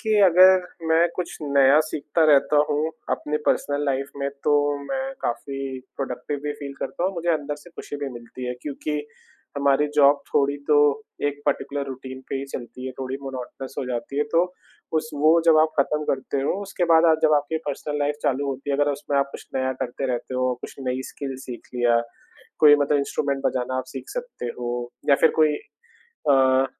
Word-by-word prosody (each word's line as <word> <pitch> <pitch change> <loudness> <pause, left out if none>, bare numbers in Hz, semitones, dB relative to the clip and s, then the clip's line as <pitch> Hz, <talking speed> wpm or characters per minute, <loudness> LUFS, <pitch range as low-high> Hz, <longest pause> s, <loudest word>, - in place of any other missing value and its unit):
कि 220 -2 +1
अगर 185 0 +7 0.3
मैं 165 +2 +5
कुछ 180 -2 -4
नया 140 0 +5
सीखता 155 +1 0
रहता 140 +1 +4
हूँ 150 +2 0 0.2
अपने 150 0 -1
पर्सनल 145 0 +1
लाइफ़ 135 0 -1
में, 140 0 -1 0.2
तो 145 -1 +3
मैं 270 - -3
काफ़ी 135 +1 -3 0.2
प्रोडक्टिव 135 +1 -4
भी 150 0 -2
फील 140 -1 -7
करता 175 - -3
हूँ, 190 - +1
मुझे 170 0 -3
अंदर 150 -1 -2
से 160 +4 -15
खुशी 145 - -6
भी 140 -1 -4
मिलती 120 +1 -8
है, 125 - -1
क्योंकि 150 +1 -3 0.6
हमारी 140 +1 +3
जॉब 145 -1 +5
थोड़ी 140 0 +3
तो 150 - +5 0.5
एक 145 0 -6
पर्टिक्युलर 140 0 -1
रूटीन 130 0 -7
पे - - -3
ही 135 - -3
चलती 130 +1 -7
है, 130 - -5
थोड़ी 130 0 -3
मोनोटनस 135 0 -7
हो - - -1
जाती 125 +3 -4
है। - - +4
तो 170 +1 +5 0.5
उस 155 0 -5
वो 155 +3 +5
जब 160 -1 +7
आप 155 0 +1
खत्म 150 +2 0
करते 135 +1 -2
हो, - - +1
उसके 195 -3 -2
बाद 165 +1 +6
आ - - +6
जब 155 -1 +5
आपकी 145 +3 -1
पर्सनल 145 +1 -3
लाइफ़ 145 0 0
चालू 140 +1 0
होती 135 +1 -4
है, 140 - +1
अगर 145 0 +2
उसमें 140 0 -1
आप 140 0 +1
कुछ - - -9
नया 130 0 0
करते 130 +1 -3
रहते 120 +1 -4
हो, 130 0 +1
कुछ - - -8
नई 130 +1 -1
स्किल 135 -2 -5
सीख 125 -2 -8
लिया, 120 -1 +3 0.6
कोई 145 -1 +8
मतलब 145 0 +2
इंस्ट्रूमेंट 140 0 -1
बजाना 130 0 -1
आप 130 - -2
सीख 135 - -7
सकते - - -5
हो, 120 0 -3 0.2
या - - +8
फिर - - +7
कोई 155 -1 +5 0.8
अ, 130 0 +5
140 Hz, 195 wpm, -24 LUFS, 130-150 Hz, 0.8 s, कोई